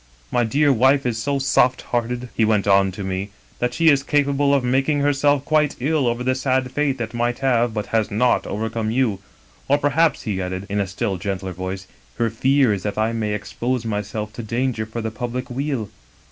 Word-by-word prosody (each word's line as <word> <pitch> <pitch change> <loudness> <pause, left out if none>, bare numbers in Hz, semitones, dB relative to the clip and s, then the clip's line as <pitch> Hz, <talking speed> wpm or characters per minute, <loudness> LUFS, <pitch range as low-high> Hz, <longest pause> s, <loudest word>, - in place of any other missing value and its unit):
My 120 - +2
dear 140 +5 +3
wife 135 +3 +3
is 115 -2 -1
so 140 +3 0
soft 130 -2 +2
hearted,' 120 +1 -2
he 115 - +2
went 110 -2 +2
on 95 -1 +4
to 100 - -6
me, 95 +1 -3 0.2
* - - -31
that 125 0 -1
she 165 -1 +4
is 140 -2 +4
capable 140 0 +1
of 140 -2 +3
making 135 +4 +1
herself 145 0 +2
quite 155 -2 +2
ill 145 0 +1
over 120 +1 -1
the 130 +1 +2
sad 130 -1 0
fate 140 -1 0
that 115 -2 -4
might 120 0 0
have, 120 -2 +2
but 105 -1 -2
has 110 -2 +2
not, 120 +4 +1
overcome 110 +1 -2
you. 115 -4 +1 0.5
Or, 145 - +4
per 145 0 +1
haps,' 160 +2 +2
he 100 -4 -2
added, 95 +1 -4
in 100 +1 -1
a 100 - 0
still 100 +1 -2
gentler 95 0 -4
voice, 95 +2 -5 0.2
' - - -32
her 115 -2 +1
fear 130 +1 +3
is 100 - -3
that 105 0 -4
I 110 +1 +1
may 105 -2 -1
expose 120 +3 -3
myself 105 0 -3
to 120 - -6
danger 115 0 -2
for 115 +1 -5
the 110 0 -3
public 120 +3 -5
weal.' 135 -4 -2
120 Hz, 215 wpm, -21 LUFS, 105-135 Hz, 0.5 s, on